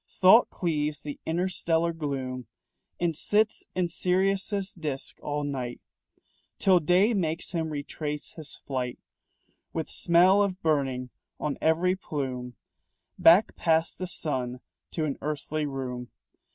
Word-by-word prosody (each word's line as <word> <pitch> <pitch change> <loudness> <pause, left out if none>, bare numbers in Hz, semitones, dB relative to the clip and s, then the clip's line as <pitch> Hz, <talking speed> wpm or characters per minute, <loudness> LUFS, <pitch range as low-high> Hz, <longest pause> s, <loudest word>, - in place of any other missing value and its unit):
Thought 195 +6 +6
cleaves 150 -4 -2
the 145 -1 -6
interstellar 170 -1 +1
gloom 135 -5 -4 0.5
And 170 -2 0
sits 210 +7 +1
in 180 -1 +1
Sirius' 190 +3 +1
disc 150 -6 -3
all 145 0 -2
night, 130 -4 -4 0.8
Till 185 -2 +5
day 180 +8 +3
makes 170 -4 -1
him 165 -3 -1
retrace 150 0 -4
his 155 -4 -7
flight, 125 -3 -4 0.8
With 160 -1 -3
smell 180 +4 +5
of 190 -2 0
burning 135 -5 0 0.3
on 150 -2 -2
every 170 +3 +3
plume, 130 - -4 0.6
Back 180 +6 +6
past 165 -1 +1
the 185 - -3
sun 130 -7 -2 0.3
to 160 - -2
an 145 - -3
earthly 150 0 -2
room. 125 -3 -5
160 Hz, 125 wpm, -27 LUFS, 140-180 Hz, 0.8 s, Thought